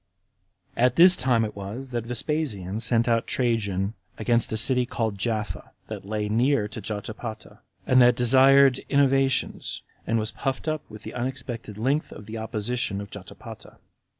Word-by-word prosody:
31. 120 - -1
About 125 - -3
this 180 +2 +8
time 120 -3 +2
it 105 - -7
was 105 +7 -7
that 120 -2 -4
Vespasian 115 - -2
sent 115 0 +1
out 115 -1 +1
Trajan 105 -5 0 0.2
against 115 +1 +1
a 110 - -1
city 125 +3 +4
called 115 -3 -2
Japha, 110 0 -3 0.2
that - - -7
lay 105 0 -2
near 115 +1 +2
to 110 0 -7
Jotapata, 110 +2 -6 0.3
and 130 0 +5
that 120 0 +6
desired 135 +2 +5
innovations, 135 -1 +1 0.2
and 115 - +1
was 110 0 -2
puffed 135 +2 -3
up 155 -1 -1
with 110 -1 -11
the - - -8
unexpected 120 -4 -5
length 135 +7 0
of 105 - -10
the 110 +1 -6
opposition 110 -1 -2
of 100 -1 -8
Jotapata. 100 -3 -11
115 Hz, 160 wpm, -25 LUFS, 110-130 Hz, 0.3 s, this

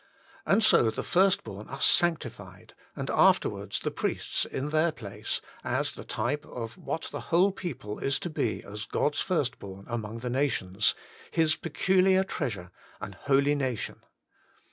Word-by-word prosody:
And 210 +3 +4
so 120 - +6
the 110 - -4
first 195 +2 +3
born 100 +2 -9
are 135 - -6
sanctified, 115 - +1 0.2
and - - -3
afterwards - - +3
the - - -2
priests - - -1
in 145 +3 -4
their 155 +2 +3
place, 105 -10 -4 0.2
as - - 0
the - - -9
type 125 +7 -2
of 115 -2 -6
what 160 - -4
the - - -4
whole 180 +4 +4
people 165 - -6
is 135 0 +1
to 175 - -3
be 120 -7 -1
as 105 +1 -7
God's 145 - 0
first 145 -9 0
born 100 0 -9
among 115 -1 -4
the 125 - -3
nations, 110 -7 +1 0.3
His 160 -1 +3
peculiar 190 +3 +3
treasure, 100 - -4 0.2
' - - -26
an - - -6
holy 140 +1 +2
nation.' 130 -6 -2
135 Hz, 160 wpm, -28 LUFS, 110-165 Hz, 0.3 s, so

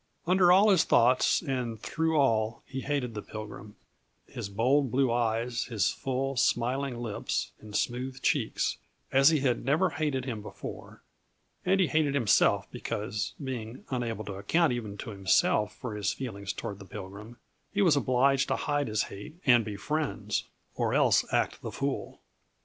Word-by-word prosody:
Under 180 0 +5
all 200 +4 +6
his 185 -5 +5
thoughts 125 +7 +3
and 125 -6 -3
through 160 0 -1
all 115 -4 +1
he 130 0 -5
hated 140 -5 -2
the 105 - -5
Pilgrim, 105 0 -9 0.5
his 100 - -6
bold 130 +7 +2
blue 130 0 +2
eyes, 115 0 0
his 110 -5 +1
full, 135 +1 -2
smiling 130 +1 +1
lips 115 -4 -3
and 105 -1 -10
smooth 130 +3 -2
cheeks, 135 -8 0 0.3
as 135 +2 +6
he 155 -4 +2
had 125 -3 +1
never 155 +8 +2
hated 145 -4 -1
him 115 -5 -4
before; 105 - -9 0.6
and 195 +1 +4
he 190 - +5
hated 155 -3 +1
himself 120 -8 +3
because, 105 0 -4
being 125 -2 -6
unable 115 -4 -2
to 100 - -5
account 155 - +2
even 110 -4 -5
to 115 - -6
himself 100 +2 +2
for 125 -4 -6
his 105 -1 0
feelings 100 -6 -5
toward 100 -1 -6
the 95 - -10
Pilgrim, 105 +4 -9 0.3
he 205 0 +2
was 170 -6 +5
obliged 135 0 +2
to - - +1
hide 145 -1 -1
his 110 -1 0
hate 105 +11 -9
and 120 -3 +6
be 105 -1 -5
friends 150 +9 -2 0.3
or - - 0
else - - +3
act - - 0
the - - -5
fool. - - -3
125 Hz, 165 wpm, -29 LUFS, 110-140 Hz, 0.6 s, all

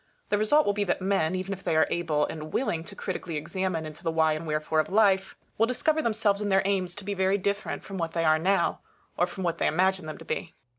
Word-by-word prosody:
The 205 - +2
result 295 +9 +4
will 205 - +2
be 205 0 0
that 180 - 0
men, 185 -3 +1
even 185 +1 -3
if 195 0 -9
they - - 0
are 155 - +5
able 155 -4 +1
and 155 -1 -7
willing 170 -11 -1
to 200 - -8
critically 175 -5 -4
examine 170 +1 -2
into 155 +3 -10
the 165 - 0
why 160 -1 +3
and 155 +1 -5
wherefore 155 +1 0
of 155 - 0
life, 195 -2 +3 0.2
will 225 - +4
discover 310 +5 +1
themselves 215 -4 +1
and 205 -1 -1
their 195 0 +4
aims 185 -3 0
to 205 - -8
be 205 - -2
very 190 +1 +2
different 200 +1 -2
from 195 -1 -6
what 165 -1 -2
they 165 -1 0
are 155 0 +4
now, 185 +1 +1 0.4
or 175 - +2
from 190 +1 -6
what 170 -2 -1
they - - +2
imagine 190 +1 +1
them 155 - -6
to - - -12
be. 165 - -4
185 Hz, 255 wpm, -27 LUFS, 160-200 Hz, 0.4 s, are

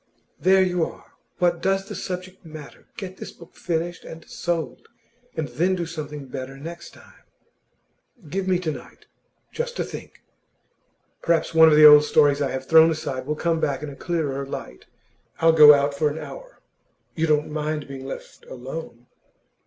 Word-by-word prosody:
'There 190 0 +4
you 180 -2 0
are! - - -8 0.3
What 175 -1 +1
does 195 +1 0
the - - -7
subject 185 0 -6
matter? 155 -3 -12
Get 190 -3 -7
this - - -8
book 170 - -16
finished 170 0 -3
and 165 0 -11
sold, 160 -8 -4 0.5
and 155 -2 -2
then 180 +5 0
do 175 -2 -3
something 150 -3 -7
better 130 +1 -7
next 170 +4 -9
time.' - - -19 1.0
'Give 190 +5 -3
me 185 -1 +3
to 160 -3 -2
night, 130 -4 -12 0.5
just 485 0 -4
to - - 0
think. - - -10 1.0
Perhaps 170 0 +1
one 160 0 +7
of 150 - +4
the 155 0 +8
old 150 0 +10
stories 145 -1 +3
I 140 - 0
have 130 0 -5
thrown 160 +2 +6
aside 140 -5 -4
will 150 - -1
come 165 +1 0
back 140 -2 -1
in 150 - -5
a - - -10
clearer 150 -6 -2
light. 135 - -8 0.5
I'll 165 0 +5
go 150 -2 +10
out 140 0 0
for 150 +2 +1
an 145 - -6
hour; - - -10 0.5
you 165 0 -1
don't 150 -1 +1
mind 150 -1 -3
being 135 -1 -8
left - - -9
alone? 130 -1 -8
160 Hz, 175 wpm, -23 LUFS, 145-175 Hz, 1.0 s, old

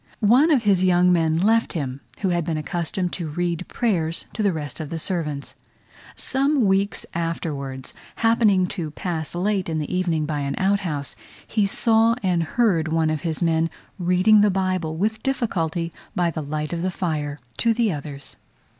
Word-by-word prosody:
One 290 +6 +5
of 275 -7 +3
his 195 -3 +3
young 180 0 +4
men 160 -2 +2
left 225 +6 +2
him, 140 -5 -4 0.2
who 195 - +1
had 175 -1 +1
been 160 0 -2
accustomed 175 +3 -2
to 170 -4 -3
read 175 +2 -2
prayers 170 -9 0
to 225 - -3
the 200 -2 +3
rest 150 -3 -5
of 155 -3 -5
the 165 - -3
servants. 155 -5 -3 0.6
Some 275 -1 +2
weeks 195 +1 +1
afterwards, 145 -6 -4 0.2
happening 225 -5 +3
to 165 -5 -3
pass 160 0 -4
late 190 0 0
in 160 - -1
the 155 +4 -2
evening 170 -4 0
by 150 -1 -2
an 140 -1 -2
outhouse, 190 -8 0 0.3
he 210 -3 +1
saw 225 +2 +3
and 180 -3 +2
heard 170 -2 +1
one 160 0 +1
of 155 - -2
his 165 0 -1
men 165 0 +2 0.3
reading 185 +4 +5
the 210 - +5
Bible 185 -4 -1
with 220 +4 -1
difficulty 170 -10 -1 0.2
by 175 -1 +1
the 155 - -4
light 150 +2 -3
of 170 - -2
the 185 - 0
fire, 155 -5 -2 0.2
to 230 - +3
the 225 -2 +2
others. 145 -2 -6
175 Hz, 175 wpm, -23 LUFS, 155-200 Hz, 0.6 s, One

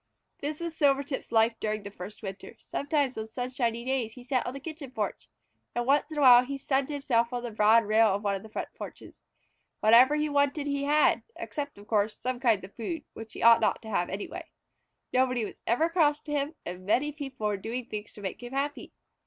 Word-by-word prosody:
This 295 +1 -4
was 335 -1 -4
Silvertip's 280 -4 +1
life 225 0 +4
during 215 -1 -2
that 200 - -8
first 200 +4 -9
winter. 195 -1 -7
Sometimes 285 -4 -1
on 220 - -4
sunshiny 240 0 -2
days 255 -4 -1
he 250 - -12
sat 255 0 +1
out - - -5
on 245 - -3
the - - -5
kitchen 305 -1 -7
porch, 220 -4 -4 0.5
and 240 0 0
once 285 +4 +2
in 310 - -6
a - - +1
while 250 -2 +9
he 275 +2 -4
sunned 270 0 0
himself 250 -5 +1
on 245 -1 -3
the 240 - -4
broad 220 +2 +5
rail 220 +2 +5
of 200 0 0
one 200 -1 +1
of 195 - -3
the 220 - -12
front - - -4
porches. - - -10 0.6
Whatever 240 +6 +6
he 300 0 +1
wanted 285 0 +1
he 280 -1 -1
had, 300 +1 +4
except, 285 -5 -5
of 205 - -13
course, 210 0 0
some 255 0 -3
kinds 230 -6 +2
of 190 - -10
food, 300 +6 -4
which 225 -1 -9
he - - -6
ought 230 0 +8
not - - +2
to 220 - -8
have 175 -3 0
anyway. 195 +2 -6 0.7
Nobody 255 -3 +2
was - - -10
ever 245 +9 +3
cross 310 -4 +2
to 300 - -8
him 290 +2 -1
and 180 +1 -6
many 255 +9 +1
people 270 -6 -6
were 210 -1 +1
doing 230 +5 -4
things 210 -2 -6
to 210 - -11
make 190 +3 -5
him 245 +1 -8
happy. 285 +2 -3
245 Hz, 225 wpm, -28 LUFS, 220-285 Hz, 0.7 s, while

